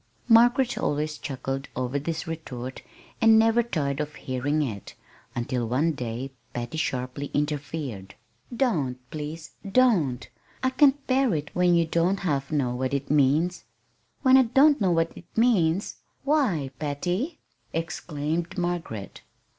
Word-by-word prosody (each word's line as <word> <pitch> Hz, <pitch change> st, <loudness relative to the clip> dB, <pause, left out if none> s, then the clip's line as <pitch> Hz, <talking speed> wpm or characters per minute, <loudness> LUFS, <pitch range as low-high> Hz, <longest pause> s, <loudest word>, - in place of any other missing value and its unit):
Margaret 240 Hz, +1 st, +5 dB
always 150 Hz, +1 st, -1 dB
chuckled 135 Hz, 0 st, -4 dB
over 130 Hz, +2 st, -1 dB
this 160 Hz, +3 st, -3 dB
retort 130 Hz, -6 st, -6 dB, 0.4 s
and 225 Hz, -1 st, +7 dB
never 225 Hz, +1 st, +4 dB
tired 145 Hz, -, -2 dB
of 150 Hz, -1 st, -3 dB
hearing 145 Hz, +4 st, -1 dB
it, 105 Hz, -8 st, -6 dB, 0.4 s
until 120 Hz, 0 st, -1 dB
one 140 Hz, +8 st, +2 dB
day 125 Hz, -1 st, -5 dB, 0.2 s
Patty 120 Hz, +6 st, -3 dB
sharply 130 Hz, +1 st, -2 dB
interfered. 145 Hz, -8 st, -3 dB, 0.4 s
"Don't 175 Hz, -, 0 dB
please 155 Hz, +1 st, -6 dB, 0.2 s
don't! 185 Hz, -, +3 dB, 0.4 s
I 260 Hz, -, +2 dB
can't 280 Hz, +1 st, +4 dB
bear 260 Hz, -6 st, +2 dB
it 150 Hz, -1 st, -4 dB
when 180 Hz, -1 st, +4 dB
you 170 Hz, -1 st, +3 dB
don't 170 Hz, +4 st, +1 dB
half 140 Hz, -7 st, -1 dB
know 135 Hz, -5 st, +1 dB
what 130 Hz, +2 st, -1 dB
it 140 Hz, 0 st, -3 dB
means." 150 Hz, +5 st, +2 dB, 0.6 s
"When 260 Hz, -1 st, +7 dB
I -, -, +8 dB
don't 270 Hz, +3 st, +4 dB
know 190 Hz, -, +3 dB
what 165 Hz, -1 st, +1 dB
it 170 Hz, -, -12 dB
means! 200 Hz, -6 st, +2 dB, 0.3 s
Why, 245 Hz, -, +1 dB
Patty!" 175 Hz, -, -2 dB, 0.3 s
exclaimed 165 Hz, 0 st, -3 dB
Margaret. 175 Hz, -, -3 dB
155 Hz, 135 wpm, -26 LUFS, 135-200 Hz, 0.6 s, I